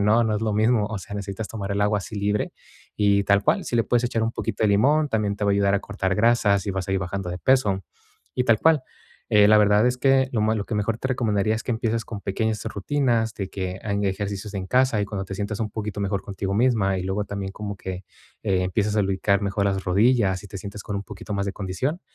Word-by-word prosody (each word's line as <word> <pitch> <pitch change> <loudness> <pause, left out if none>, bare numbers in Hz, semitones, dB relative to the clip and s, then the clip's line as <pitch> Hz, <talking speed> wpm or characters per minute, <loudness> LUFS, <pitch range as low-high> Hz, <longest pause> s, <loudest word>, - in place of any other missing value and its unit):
No, 110 +3 +4
no 110 -1 0
es - - -3
lo 110 -1 0
mismo, 110 0 +3
o 110 0 -4
sea, 100 - -9
necesitas 100 +1 -4
tomar 100 -1 -4
el 100 - -1
agua 105 0 +2
así 105 - -8
libre 105 +1 -1 0.4
y 100 -1 +3
tal 100 0 +3
cual, - - +2
si 120 - -2
le 115 - +3
puedes 120 0 +1
echar 115 -2 0
un 115 +1 0
poquito - - -2
de - - +4
limón, 145 +10 +3
también 105 -2 0
te 105 - -2
va 100 - +3
a - - +3
ayudar 100 0 +2
a 100 - +1
cortar 95 -2 -2
grasas 105 -3 +3
y - - 0
vas 95 -1 -3
a - - 0
ir 95 - +2
bajando 95 0 -4
de 90 - -4
peso 105 -8 +2 0.5
y 125 - +1
tal 115 -3 +4
cual. 160 -1 +4 0.5
Eh, 105 -1 +7
la 105 0 +7
verdad 105 +2 +4
es 125 0 +1
que 135 0 +3
lo 115 - 0
ma 110 +1 +2
lo 100 - -2
que 115 - -4
mejor 105 +2 -1
te - - -3
recomendaría, 110 -4 +1
es 110 - -4
que - - -3
empieces 115 0 -1
con 105 -3 -7
pequeñas 110 +2 -2
rutinas, 115 +1 0
de 95 -2 -4
que 95 -1 -4
hagan 100 -1 -1
ejercicios 100 +1 -3
en 95 -1 -3
casa 125 -1 +2
y, - - +1
cuando 100 -1 -4
te 95 - -6
sientas 105 +1 -3
un 110 -2 -2
poquito 105 -1 -4
mejor 100 0 -1
contigo 95 -1 -4
misma, 105 -5 +2
y - - -3
luego 95 +2 -1
también 100 -1 -5
como 100 -1 -6
que, 95 -1 -6 0.4
eh, 95 -1 +1
empiezas 105 +3 0
a 105 - +3
lubricar 95 +1 +1
mejor 100 0 0
las 95 -1 -1
rodillas 100 0 +2
y - - -10
te 95 - -7
sientes 100 +2 -8
con 100 - -4
un 100 - -3
poquito 105 +1 -8
más 100 0 -1
de 100 - -2
condición, 105 - -3
105 Hz, 260 wpm, -24 LUFS, 100-110 Hz, 0.5 s, Eh